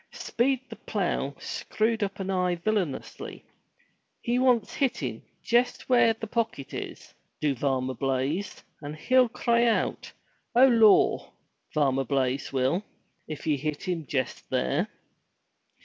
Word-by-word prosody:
Speed 260 Hz, +2 st, 0 dB
the 225 Hz, -, -7 dB
Plough 175 Hz, -9 st, -2 dB
screwed 220 Hz, +1 st, -1 dB
up 200 Hz, 0 st, -2 dB
an 195 Hz, 0 st, -2 dB
eye 180 Hz, -1 st, +1 dB
villainously. 175 Hz, -5 st, -3 dB, 0.8 s
"He 240 Hz, 0 st, +1 dB
wants 250 Hz, -3 st, +3 dB
hittin' 135 Hz, -, -1 dB, 0.2 s
jest 240 Hz, +2 st, +1 dB
where 240 Hz, -2 st, +5 dB
the 225 Hz, 0 st, -6 dB
pocket 225 Hz, -, -2 dB
is, -, -, -7 dB, 0.3 s
do 150 Hz, -2 st, +1 dB
Varmer 130 Hz, 0 st, -1 dB
Blaize, 135 Hz, +9 st, -2 dB, 0.2 s
and 150 Hz, 0 st, -6 dB
he'll 250 Hz, +9 st, +3 dB
cry 235 Hz, 0 st, +2 dB
out, 230 Hz, -, 0 dB, 0.4 s
'O 250 Hz, +2 st, +8 dB
Lor,' 225 Hz, -5 st, +5 dB, 0.4 s
Varmer 135 Hz, -3 st, +2 dB
Blaize 135 Hz, 0 st, 0 dB
will, 135 Hz, +8 st, +1 dB, 0.4 s
if 155 Hz, -2 st, -7 dB
ye 150 Hz, -2 st, +2 dB
hit 150 Hz, +1 st, -3 dB
him 165 Hz, -5 st, -2 dB
jest 130 Hz, -3 st, -3 dB
there." 65 Hz, -, 0 dB
180 Hz, 130 wpm, -27 LUFS, 140-230 Hz, 0.8 s, O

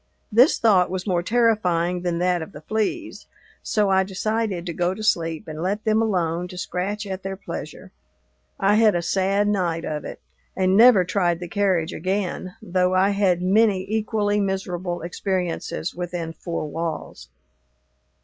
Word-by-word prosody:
This 245 Hz, +9 st, +5 dB
thought 195 Hz, -6 st, +4 dB
was 185 Hz, 0 st, -4 dB
more 180 Hz, -4 st, +1 dB
terrifying 180 Hz, -6 st, +1 dB
than 175 Hz, -1 st, -1 dB
that 180 Hz, 0 st, +1 dB
of 160 Hz, -, -8 dB
the 150 Hz, -, -10 dB
fleas, 220 Hz, -, -3 dB, 0.3 s
so 210 Hz, -4 st, +1 dB
I 190 Hz, 0 st, +4 dB
decided 200 Hz, -1 st, -2 dB
to 170 Hz, -, -4 dB
go 175 Hz, +2 st, 0 dB
to 215 Hz, -, -7 dB
sleep 165 Hz, -6 st, 0 dB
and 155 Hz, 0 st, -6 dB
let 200 Hz, +4 st, -1 dB
them 220 Hz, 0 st, +2 dB
alone 180 Hz, -5 st, 0 dB
to 180 Hz, -, -10 dB
scratch 195 Hz, +4 st, -3 dB
at 190 Hz, -1 st, -5 dB
their 195 Hz, 0 st, -4 dB
pleasure. 200 Hz, -, -8 dB, 0.7 s
I 205 Hz, +2 st, +3 dB
had 215 Hz, -3 st, +5 dB
a 170 Hz, -, -1 dB
sad 195 Hz, +3 st, +1 dB
night 175 Hz, -5 st, 0 dB
of 150 Hz, -1 st, -3 dB
it, -, -, -8 dB, 0.4 s
and 190 Hz, 0 st, +2 dB
never 225 Hz, -3 st, +7 dB
tried 175 Hz, -2 st, 0 dB
the 175 Hz, -, -6 dB
carriage 185 Hz, -3 st, 0 dB
again, 185 Hz, 0 st, -3 dB
though 180 Hz, +1 st, +1 dB
I 190 Hz, +2 st, +4 dB
had 190 Hz, -3 st, +1 dB
many 195 Hz, 0 st, +3 dB
equally 210 Hz, -1 st, 0 dB
miserable 185 Hz, -3 st, -2 dB
experiences 180 Hz, -1 st, -3 dB
within 175 Hz, -2 st, -4 dB
four 165 Hz, 0 st, -4 dB
walls. 160 Hz, -, -5 dB
185 Hz, 160 wpm, -23 LUFS, 175-205 Hz, 0.7 s, never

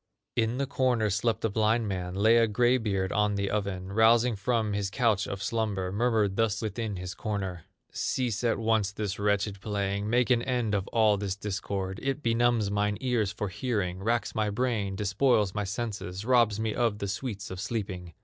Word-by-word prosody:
In 115 Hz, +2 st, 0 dB
a 140 Hz, -, +1 dB
corner 125 Hz, -5 st, +1 dB
slept 110 Hz, +3 st, 0 dB
a -, -, +2 dB
blind 110 Hz, +2 st, +2 dB
man, 90 Hz, -2 st, -3 dB
Lay 110 Hz, +4 st, +5 dB
a 115 Hz, -1 st, +4 dB
gray 120 Hz, +4 st, +3 dB
beard 95 Hz, -4 st, -1 dB
on 105 Hz, -1 st, +1 dB
the 100 Hz, 0 st, -1 dB
oven, 100 Hz, -2 st, -3 dB
Rousing 115 Hz, +2 st, +4 dB
from 110 Hz, 0 st, 0 dB
his 100 Hz, -1 st, -1 dB
couch 110 Hz, -3 st, +1 dB
of 100 Hz, 0 st, -5 dB
slumber, 105 Hz, -5 st, -1 dB
Murmured 105 Hz, -2 st, +1 dB
thus 115 Hz, -3 st, +1 dB
within 110 Hz, -1 st, -3 dB
his 90 Hz, 0 st, -5 dB
corner: 95 Hz, -5 st, -4 dB, 0.3 s
"Cease 125 Hz, -4 st, -1 dB
at 115 Hz, -2 st, +2 dB
once 110 Hz, -3 st, +1 dB
this 105 Hz, -1 st, -4 dB
wretched 100 Hz, -1 st, 0 dB
playing, 100 Hz, 0 st, -2 dB
Make 125 Hz, +2 st, +2 dB
an 120 Hz, -2 st, +4 dB
end 120 Hz, -4 st, -1 dB
of 100 Hz, -1 st, 0 dB
all 110 Hz, -3 st, +3 dB
this 100 Hz, -2 st, -2 dB
discord; 100 Hz, -1 st, -4 dB
It 135 Hz, +2 st, -2 dB
benumbs 115 Hz, -3 st, +2 dB
mine 105 Hz, 0 st, 0 dB
ears 120 Hz, -6 st, 0 dB
for 105 Hz, -1 st, -4 dB
hearing, 95 Hz, -3 st, -2 dB
Racks 115 Hz, +1 st, 0 dB
my 110 Hz, -1 st, 0 dB
brain, 105 Hz, -3 st, -1 dB
despoils 105 Hz, 0 st, +2 dB
my 105 Hz, -1 st, -2 dB
senses, 100 Hz, -2 st, -4 dB
Robs 120 Hz, -4 st, +3 dB
me 110 Hz, -1 st, -1 dB
of 115 Hz, -4 st, +1 dB
the 100 Hz, -, -3 dB
sweets 105 Hz, +1 st, -4 dB
of 95 Hz, -, -6 dB
sleeping. 95 Hz, -5 st, -4 dB
105 Hz, 190 wpm, -28 LUFS, 100-115 Hz, 0.3 s, Lay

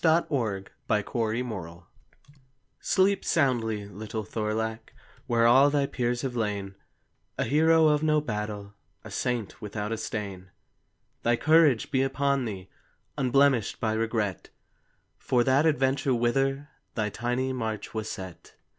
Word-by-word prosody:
A 165 Hz, 0 st, +4 dB
NORSE 110 Hz, -8 st, -1 dB
CHILD'S -, -, -19 dB, 0.2 s
REQUIEM 110 Hz, -5 st, -2 dB, 1.0 s
Sleep 195 Hz, 0 st, +2 dB
soundly, 115 Hz, -9 st, +1 dB
little 110 Hz, +2 st, -6 dB
Thorlak, 110 Hz, +1 st, -3 dB, 0.3 s
Where 115 Hz, -1 st, +3 dB
all 130 Hz, +4 st, +6 dB
thy 145 Hz, -1 st, +1 dB
peers 120 Hz, -2 st, -2 dB
have 130 Hz, -2 st, -3 dB
lain, 100 Hz, -4 st, -2 dB, 0.6 s
A -, -, +1 dB
hero 160 Hz, +2 st, +4 dB
of 150 Hz, -1 st, +3 dB
no 155 Hz, -1 st, +3 dB
battle, 105 Hz, -5 st, -4 dB, 0.3 s
A 110 Hz, -, -10 dB
saint 120 Hz, 0 st, -3 dB
without 105 Hz, 0 st, -4 dB
a 115 Hz, -, -2 dB
stain! 100 Hz, -4 st, -5 dB, 0.7 s
Thy 120 Hz, +1 st, +2 dB
courage 155 Hz, -2 st, +4 dB
be 130 Hz, -2 st, +2 dB
upon 135 Hz, 0 st, +1 dB
thee, 95 Hz, -4 st, -6 dB, 0.5 s
Unblemished 135 Hz, -3 st, +2 dB
by 110 Hz, -1 st, 0 dB
regret, 110 Hz, -3 st, -2 dB, 0.7 s
For 125 Hz, -2 st, +2 dB
that 135 Hz, +5 st, +3 dB
adventure 135 Hz, -3 st, +1 dB
whither 135 Hz, +4 st, 0 dB, 0.3 s
Thy 105 Hz, -2 st, 0 dB
tiny 125 Hz, +4 st, -2 dB
march 110 Hz, -4 st, -4 dB
was 110 Hz, -1 st, -3 dB
set. 95 Hz, -3 st, -9 dB
120 Hz, 130 wpm, -27 LUFS, 105-135 Hz, 1.0 s, all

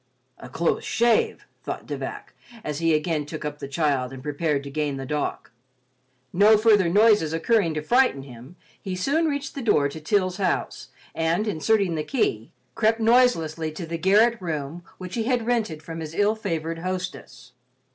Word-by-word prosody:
"A 125 Hz, -, -10 dB
close 165 Hz, +6 st, 0 dB
shave," 235 Hz, -1 st, +1 dB, 0.2 s
thought -, -, -5 dB
De -, -, -4 dB
Vac, -, -, -7 dB, 0.3 s
as 150 Hz, -1 st, -4 dB
he 165 Hz, -1 st, +3 dB
again 155 Hz, 0 st, -1 dB
took 155 Hz, 0 st, -6 dB
up 150 Hz, 0 st, -5 dB
the -, -, -6 dB
child 140 Hz, -4 st, 0 dB
and 130 Hz, -1 st, -9 dB
prepared 150 Hz, -1 st, -1 dB
to 140 Hz, -, -8 dB
gain 145 Hz, -1 st, -2 dB
the 135 Hz, -, -5 dB
dock. 150 Hz, +2 st, -3 dB, 0.8 s
No 210 Hz, +4 st, +6 dB
further 210 Hz, -5 st, +4 dB
noises 205 Hz, -4 st, +4 dB
occurring 165 Hz, 0 st, +1 dB
to 155 Hz, -, -3 dB
frighten 245 Hz, -, +2 dB
him, 130 Hz, +4 st, -12 dB, 0.3 s
he 190 Hz, -2 st, -4 dB
soon 285 Hz, -, +1 dB
reached 285 Hz, -2 st, -3 dB
the 275 Hz, -, -5 dB
door 150 Hz, -, +2 dB
to 160 Hz, +2 st, -9 dB
Til's 185 Hz, +2 st, 0 dB
house 185 Hz, -3 st, -2 dB, 0.3 s
and, 165 Hz, +6 st, 0 dB
inserting 200 Hz, 0 st, +1 dB
the 155 Hz, -1 st, -2 dB
key, 120 Hz, -, -1 dB, 0.2 s
crept 225 Hz, +1 st, +2 dB
noiselessly 220 Hz, -10 st, +2 dB
to 170 Hz, +2 st, -6 dB
the 165 Hz, 0 st, -5 dB
garret 210 Hz, +6 st, +4 dB
room 160 Hz, -1 st, -4 dB
which 185 Hz, -1 st, -8 dB
he 225 Hz, -2 st, -1 dB
had 245 Hz, -2 st, 0 dB
rented 220 Hz, -10 st, -1 dB
from 165 Hz, +1 st, -7 dB
his 160 Hz, 0 st, -7 dB
ill 205 Hz, +1 st, +3 dB
favored 165 Hz, -6 st, -3 dB
hostess. 185 Hz, +1 st, -6 dB
170 Hz, 175 wpm, -24 LUFS, 150-215 Hz, 0.8 s, No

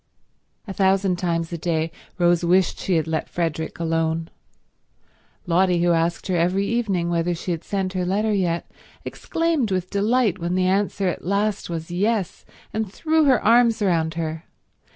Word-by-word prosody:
A 195 Hz, -, -5 dB
thousand 190 Hz, -1 st, +2 dB
times 170 Hz, -1 st, -2 dB
a 170 Hz, -, -4 dB
day 160 Hz, -1 st, -1 dB, 0.3 s
Rose 175 Hz, -1 st, +3 dB
wished 180 Hz, +1 st, +2 dB
she 185 Hz, -, 0 dB
had 160 Hz, -, +1 dB
let 160 Hz, -1 st, -2 dB
Frederick 165 Hz, -2 st, -3 dB
alone. 165 Hz, 0 st, -1 dB, 1.1 s
Lotty, 180 Hz, 0 st, +2 dB
who 175 Hz, -, +3 dB
asked 165 Hz, +1 st, 0 dB
her 185 Hz, -, -1 dB
every 180 Hz, +4 st, +1 dB
evening 200 Hz, -7 st, 0 dB
whether 170 Hz, +1 st, 0 dB
she 175 Hz, +2 st, -4 dB
had 165 Hz, -1 st, -3 dB
sent 190 Hz, -2 st, -2 dB
her 185 Hz, -1 st, -1 dB
letter 210 Hz, +4 st, 0 dB
yet, 175 Hz, -4 st, 0 dB, 0.4 s
exclaimed 330 Hz, -8 st, -1 dB
with 185 Hz, -2 st, -2 dB
delight 210 Hz, -1 st, +1 dB
when 175 Hz, +1 st, -2 dB
the 185 Hz, 0 st, +2 dB
answer 195 Hz, +1 st, +1 dB
at 180 Hz, -, -3 dB
last 200 Hz, +2 st, -1 dB
was 165 Hz, 0 st, -5 dB
yes, 200 Hz, +1 st, -1 dB, 0.3 s
and 215 Hz, -3 st, -2 dB
threw 315 Hz, +7 st, +1 dB
her 260 Hz, -5 st, +4 dB
arms 230 Hz, 0 st, +5 dB
round 165 Hz, -5 st, +1 dB
her. 160 Hz, 0 st, -4 dB
180 Hz, 165 wpm, -23 LUFS, 170-200 Hz, 1.1 s, arms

